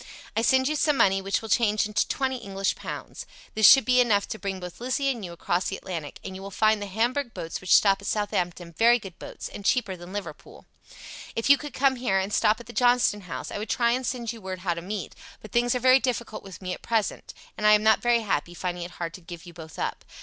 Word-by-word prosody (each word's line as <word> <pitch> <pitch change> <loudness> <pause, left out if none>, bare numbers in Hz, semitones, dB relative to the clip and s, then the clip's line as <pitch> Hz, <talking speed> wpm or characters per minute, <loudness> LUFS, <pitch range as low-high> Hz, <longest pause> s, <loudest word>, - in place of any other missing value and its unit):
I 225 - +2
send 260 +3 +3
you 305 - 0
some 295 -1 +2
money 195 -4 +3
which 195 +3 -1
will - - -6
change 215 -3 +2
into 210 0 0
twenty 265 -1 -1
English 195 -4 -2
pounds. - - -7 0.3
This 215 -1 +6
should 270 - +8
be 250 0 +5
enough 205 -5 +2
to 220 - -5
bring 195 -2 -4
both 180 -1 -9
Lizzie 270 +2 0
and 235 -5 -6
you 175 - -6
across 175 +1 -1
the 195 - -4
Atlantic, 165 -6 -6
and 190 - -7
you 190 - -8
will 195 - -7
find 215 +2 +2
the 205 - -4
Hamburg 240 +6 -1
boats 165 - -5
which 185 - +4
stop 195 -1 +4
at 200 - -8
Southampton 175 -5 -2
very 235 +7 +5
good 195 -6 -11
boats, - - -8
and 205 - -9
cheaper 205 -3 +1
than 175 +1 -11
Liverpool. 205 0 -8 0.7
If 230 +5 +2
you 280 - +8
could 295 -1 -8
come 270 -1 +2
here 240 -6 0
and 190 +2 -2
stop 215 +1 +3
at 240 - -11
the 240 - -11
Johnston 245 -4 +3
House - - -5
I - - -4
would 215 - -6
try 235 -1 +2
and 255 +2 0
send 240 -3 -3
you 230 - -11
word 185 -1 -6
how 180 -2 0
to 170 - -6
meet, 195 -1 -5 0.3
but 215 - -13
things 240 +1 +2
are - - 0
very 255 +1 +6
difficult 240 -4 -3
with 195 -1 -11
me 180 0 -3
at - - -8
present, 225 -3 -2 0.2
and 210 - +1
I 210 - +8
am 210 0 +4
not 220 0 +4
very 240 -1 +3
happy, 175 -5 -2
finding 175 0 -4
it 175 - -7
hard 165 -1 -4
to 185 - -10
give 170 -1 -10
you 175 - -11
both 160 -2 -11
up. - - -3
210 Hz, 260 wpm, -26 LUFS, 185-240 Hz, 0.7 s, should